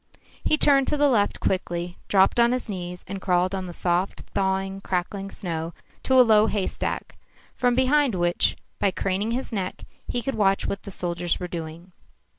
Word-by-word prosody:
He 310 - +3
turned 275 -3 +5
to 300 - 0
the 290 0 +4
left 215 -7 +2
quickly, 175 -1 -2
dropped 195 +3 +4
on 235 +1 +5
his 255 -1 -2
knees, 180 -3 -6
and 195 0 -6
crawled 180 0 +1
on 190 -1 -3
the - - -6
soft, 175 +2 -1
thawing, 195 0 -1
crackling 195 +2 -3
snow 165 -3 -5 0.3
to 260 - +1
a 255 -1 +8
low 215 -1 +5
haystack, 205 -4 -3 0.4
from 245 -1 +1
behind 260 -2 +3
which, 175 -1 +1 0.2
by 200 - +3
craning 195 +3 -1
his 255 +2 -3
neck, 190 -4 -4 0.2
he 245 - -2
could 270 - -2
watch 195 -3 +2
what 200 - -3
the - - -9
soldiers 175 -2 -1
were 180 - -4
doing. 170 +1 -7
195 Hz, 180 wpm, -25 LUFS, 180-230 Hz, 0.4 s, a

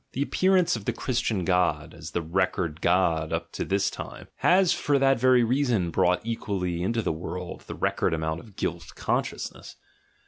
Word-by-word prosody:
The 135 - 0
appearance 185 +2 +3
of - - -7
the 120 - 0
Christian 115 -7 -1
god, 85 -5 +1
as 80 -1 -8
the 85 - -2
record 85 -1 -1
god 85 -3 +2
up 85 0 -3
to - - -3
this 100 0 0
time, - - -8
has 185 0 +4
for 145 -1 +1
that 135 -2 +3
very 130 -1 +5
reason 120 -8 +1
brought 90 +3 +2
equally 95 -6 -2
into 115 +5 0
the - - 0
world 90 +2 -6
the - - -6
record - - 0
amount 80 0 -2
of 105 0 -15
guilt 85 0 -4
consciousness. - - -3
95 Hz, 175 wpm, -26 LUFS, 85-125 Hz, -, very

